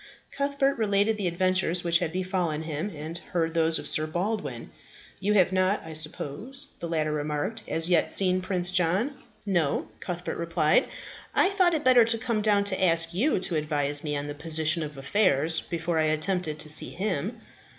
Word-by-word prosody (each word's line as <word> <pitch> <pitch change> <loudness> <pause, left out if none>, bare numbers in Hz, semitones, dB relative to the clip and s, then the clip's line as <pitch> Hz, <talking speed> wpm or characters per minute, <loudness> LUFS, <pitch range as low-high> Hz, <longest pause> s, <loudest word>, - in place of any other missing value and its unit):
Cuthbert 280 -1 0
related 210 0 +1
the 195 - 0
adventures 180 0 +1
which 170 -1 +3
had 175 -3 -2
befallen 180 -4 -2
him, 160 +5 -4
and 160 +3 -7
heard 165 -3 -2
those 165 -1 +2
of - - -5
Sir 155 0 +2
Baldwin. 175 - -4 0.5
"You 205 +2 0
have 185 -2 +4
not, 185 +2 +1
I 160 - -8
suppose," 155 - -1
the 170 - -5
latter 155 -2 0
remarked, 150 +8 -3
"as 165 0 0
yet 175 -3 +2
seen 185 -1 +1
Prince 180 -1 0
John?" 185 - +1 0.3
"No," 175 -8 0
Cuthbert 175 -1 -5
replied, 165 -2 +2 0.5
"I 375 - +3
thought 365 -4 +2
it 305 - -2
better 255 -3 +6
to 230 0 +4
come 230 -2 -2
down 205 -1 +3
to 190 -1 0
ask 165 -1 +2
you 245 - +1
to 175 - -1
advise 145 -2 0
me 150 -2 -2
on 145 - -4
the 145 - -5
position 155 +2 +2
of 150 -2 -6
affairs 160 0 +2
before 170 -1 -2
I 155 - +2
attempted 155 +1 -1
to 155 - -5
see 150 - +1
him." 200 - -3
175 Hz, 180 wpm, -26 LUFS, 155-200 Hz, 0.5 s, better